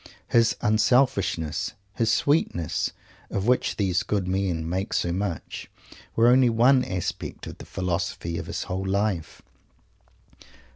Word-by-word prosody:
His 115 -1 +4
"unselfishness," 110 - +2 0.2
his 115 -1 +1
"sweetness," 120 - +1 0.4
of 100 - -2
which 125 +1 +2
these 95 -2 +1
good 100 -4 -1
men 90 -4 -1
make 95 +3 -2
so 85 - +1
much, 90 -2 -4 0.5
were 115 +1 +5
only 125 0 +5
one 125 +3 +4
aspect 90 -6 -4
of - - -9
the - - -9
Philosophy 85 -2 -2
of - - -7
his - - -3
whole 95 +1 -3
life. 100 -3 -1
100 Hz, 130 wpm, -25 LUFS, 90-115 Hz, 0.5 s, were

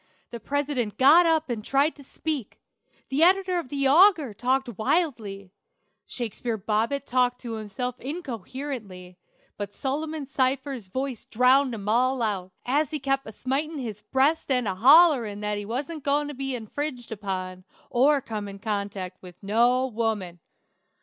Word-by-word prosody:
The 235 - -6
president 275 -3 -2
got 315 +6 +7
up 320 -1 +2
and 230 -4 -4
tried 280 +6 +2
to 285 - -14
speak; 280 -3 -5 0.5
the 270 +3 0
editor 365 +1 +4
of 285 - -7
the 275 -1 0
Auger 315 - +5
talked 250 +2 -1
wildly; 215 - -1 0.6
Shakespeare 235 -1 -4
Bobbet 225 +7 -1
talked 250 0 +1
to 235 -2 -5
himself 225 +3 -5
incoherently, 245 - -6 0.4
but 205 0 -6
Solomon 305 +2 -3
Cypher's 265 -3 -1
voice 260 +4 -4
drowned 255 +2 +3
'em 205 -2 -8
all 250 +3 +2
out, 190 -4 -2
as 285 +3 +1
he 310 - -2
kep' 270 -1 -1
a - - -6
smitin' 280 +8 -2
his 220 -6 -5
breast 270 +9 +1
and 250 -4 +1
a 190 - 0
hollerin' 250 - +5
that 210 0 -1
he 205 - -6
wasn't 280 +7 -4
goin' 290 +1 +1
to - - -5
be 270 -1 -3
infringed 245 +2 -5
upon, 185 -3 -5 0.3
or 275 +3 +4
come 215 -4 -5
in 200 0 -8
contract 200 -3 -4
with 180 -2 -12
no 240 +5 +3
woman! 215 -7 -2
250 Hz, 155 wpm, -26 LUFS, 210-280 Hz, 0.6 s, got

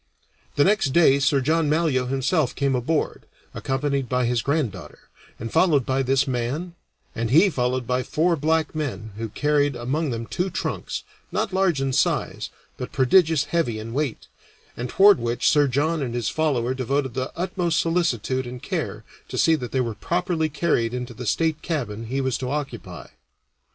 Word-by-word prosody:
The 145 - +4
next 190 -8 +2
day 150 -5 +5
Sir 140 0 +2
John 155 +3 +1
Malyoe 150 -5 +1
himself 135 +2 0
came 140 -1 +1
aboard, 130 +5 -1 0.3
accompanied 135 -1 -1
by 125 -1 +1
his 120 -1 +1
granddaughter, 115 - -2 0.4
and 115 0 -5
followed 150 -9 +3
by 130 +1 +1
this 135 +2 +2
man, 130 +8 -2 0.4
and 115 -1 -2
he 165 - +5
followed 125 -2 0
again - - -17
by 125 +2 0
four 165 +7 +1
black 160 +1 0
men, 115 - -4
who 115 -1 -3
carried 145 +3 +1
among 135 +6 -1
them 115 -2 -3
two 180 +9 -2
trunks, 185 - -4 0.3
not 195 - -1
large 190 -6 +2
in 135 -1 -1
size, - - 0 0.3
but - - -6
prodigious 155 +3 +4
heavy 155 -7 -1
in 110 +1 -7
weight, 140 -3 -2 0.5
and 125 +1 -4
toward 200 -5 +6
which 120 0 0
Sir 145 -2 +4
John 150 +5 0
and 120 -3 -3
his 120 -4 -1
follower 130 -6 0
devoted 130 0 -1
the 130 +1 -3
utmost 175 -3 0
solicitude 130 - 0
and 125 0 -7
care - - -4 0.2
to - - -6
see 165 - +4
that 125 -6 -2
they 130 - +1
were 115 -2 -2
properly 170 - -1
carried 130 -7 0
into 125 -1 -5
the 120 +1 -7
state 160 +3 0
cabin 115 -9 -3
he 135 +4 -1
was 130 -2 -1
to 125 - -3
occupy. 125 -11 -5
135 Hz, 175 wpm, -24 LUFS, 125-160 Hz, 0.5 s, toward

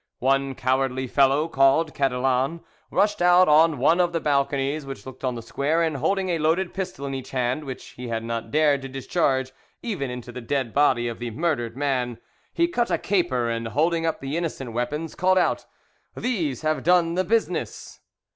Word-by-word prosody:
One 135 +1 +1
cowardly 130 +1 0
fellow, 140 +4 +3
called 145 +2 +3
Cadillan, 135 +3 0 0.3
rushed 205 -2 +1
out 180 +1 +6
on 155 0 +5
one 155 +7 +3
of 175 -1 0
the 165 - +1
balconies 140 0 0
which 135 0 -8
looked 130 0 -11
on 130 -2 -1
the 115 - -7
square, 150 +8 0
and, 160 -3 -1
holding 190 +6 0
a 170 -2 0
loaded 165 +4 +1
pistol 185 -7 -5
in 135 - -4
each 130 -1 -6
hand, 130 +3 -1
which 130 -2 -7
he 125 0 -9
had 115 -1 -3
not 115 0 -4
dared 150 -2 +3
to 135 - -7
discharge 130 -1 0 0.3
even 185 - -3
into 125 -1 -7
the 125 - -7
dead 130 -1 -2
body 130 -4 +3
of 115 - -5
the 120 0 -4
murdered 120 -3 -2
man, 130 -4 -1 0.3
he 340 - +2
cut 245 -9 -1
a - - +1
caper, 170 -12 0
and, 115 0 -2
holding 165 +7 +1
up 165 -1 -1
the 135 +2 -4
innocent 150 -8 -3
weapons, 150 +7 -3
called 185 +1 +2
out, 180 - +1 0.5
"These 165 - -2
have 155 0 0
done 170 -1 +3
the 185 +2 +1
business!" 225 +4 -2
140 Hz, 190 wpm, -24 LUFS, 130-165 Hz, 0.5 s, out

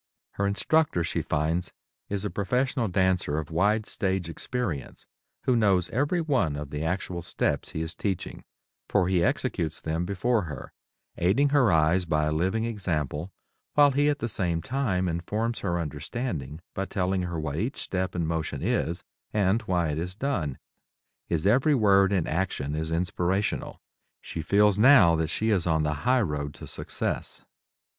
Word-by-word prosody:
Her 100 - -1
instructor, 100 - +2
she - - -1
finds, 80 +4 -1 0.4
is 100 0 -2
a 105 - -2
professional 125 +4 0
dancer 90 -5 +1
of 80 -1 -4
wide 105 +6 +2
stage 95 -6 -2
experience, 85 - -4 0.4
who 130 - +2
knows 100 -6 +3
every 145 +8 +1
one 130 - +1
of 75 -1 -6
the 75 +1 -3
actual 90 +1 -2
steps - - -1
he 80 - -2
is 80 +1 -5
teaching, 95 -4 -4 0.5
for 90 - +3
he 90 -2 +2
executes 105 - -1
them 80 +2 -2
before 105 +1 +1
her, 75 -4 -8 0.4
aiding 115 +12 +3
her 135 -7 +4
eyes 80 +3 +3
by 75 -2 +1
a 75 - 0
living 95 +8 0
example, 85 - -2 0.4
while 145 -1 +6
he 145 +2 +3
at 145 - +1
the 115 - -2
same 90 -6 -1
time 95 - -1
informs 105 +8 -2
her 85 -3 -1
understanding 80 - -4
by 95 - -2
telling 95 -1 -1
her 85 -2 -3
what 75 -1 -3
each 120 - -2
step 95 0 -2
and 85 -2 0
motion 80 -4 -2
is 85 +2 0 0.3
and 105 +2 +2
why 85 -3 +1
it 75 +1 -2
is 90 +2 -4
done. 100 - -2 0.7
His 85 0 -1
every 130 +8 +4
word 100 -4 +4
and 95 -5 +1
action 80 -4 -1
is 80 +1 -2
inspirational. 90 +4 -1 0.4
She 80 - -6
feels 105 +3 +3
now 110 -9 +7
that 80 0 0
she 110 +6 0
is 90 -4 +1
on 80 -2 +2
the 75 0 0
highroad 75 - 0
to - - -9
success. - - -4
90 Hz, 165 wpm, -27 LUFS, 80-110 Hz, 0.7 s, now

